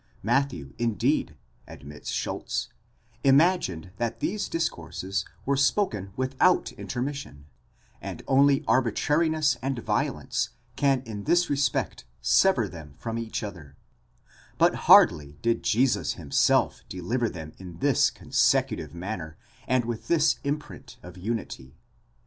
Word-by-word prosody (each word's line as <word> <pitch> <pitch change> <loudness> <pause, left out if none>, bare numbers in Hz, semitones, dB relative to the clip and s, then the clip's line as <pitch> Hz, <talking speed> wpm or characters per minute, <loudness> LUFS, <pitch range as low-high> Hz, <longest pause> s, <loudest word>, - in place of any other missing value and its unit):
Matthew, 115 - 0
indeed, 115 - 0 0.3
admits 75 +1 -10
Schulz, - - -3 0.5
imagined 135 - +3
that 120 -1 -2
these 205 +2 -2
discourses 100 - -3 0.2
were 140 - +2
spoken 135 - +1
without 130 +8 +2
intermission, 125 - -5 0.6
and - - -7
only 140 +1 +4
arbitrariness 145 +5 +2
and 135 0 -2
violence 120 +1 -1 0.3
can 135 -2 +2
in 105 -4 -7
this 175 -1 +2
respect 135 - -1
sever - - +3
them 75 -4 -11
from 115 +9 -4
each 115 -1 -4
other; 85 -9 -8 0.8
but - - +4
hardly 75 -1 +5
did 115 0 +1
Jesus 120 +3 +1
himself 75 -6 +1
deliver 115 +7 -1
them 80 -4 -8
in 90 -3 -10
this - - +3
consecutive - - 0
manner, 85 -4 -6 0.3
and 130 -1 +2
with 115 -1 -5
this 160 -3 +3
imprint 145 +2 -5
of 90 0 -11
unity. 95 - -5
115 Hz, 115 wpm, -26 LUFS, 90-140 Hz, 0.8 s, hardly